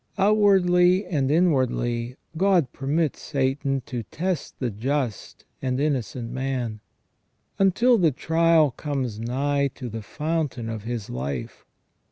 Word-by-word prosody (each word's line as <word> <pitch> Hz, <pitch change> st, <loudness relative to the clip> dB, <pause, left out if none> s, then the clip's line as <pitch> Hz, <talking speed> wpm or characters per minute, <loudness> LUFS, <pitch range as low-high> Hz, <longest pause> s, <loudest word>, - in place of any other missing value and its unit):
Outwardly 190 Hz, -2 st, +4 dB
and 145 Hz, -7 st, 0 dB
inwardly 130 Hz, -7 st, +1 dB, 0.2 s
God 180 Hz, -6 st, +3 dB
permits 145 Hz, +3 st, -1 dB
Satan 135 Hz, -1 st, -1 dB
to 120 Hz, -2 st, -4 dB
test 175 Hz, -, -3 dB
the 125 Hz, -3 st, -2 dB
just 125 Hz, +1 st, -3 dB, 0.2 s
and 130 Hz, -1 st, -1 dB
innocent 125 Hz, -5 st, -2 dB
man, 130 Hz, -4 st, -3 dB, 0.8 s
until 230 Hz, +5 st, +4 dB
the 170 Hz, -3 st, +5 dB
trial 160 Hz, +1 st, +3 dB
comes 130 Hz, -5 st, -3 dB
nigh 140 Hz, +4 st, 0 dB
to 125 Hz, -3 st, -6 dB
the 115 Hz, 0 st, -5 dB
fountain 150 Hz, -2 st, -3 dB
of 110 Hz, -2 st, -5 dB
his 115 Hz, -3 st, -4 dB
life. 65 Hz, +1 st, -5 dB
135 Hz, 120 wpm, -24 LUFS, 120-165 Hz, 0.8 s, the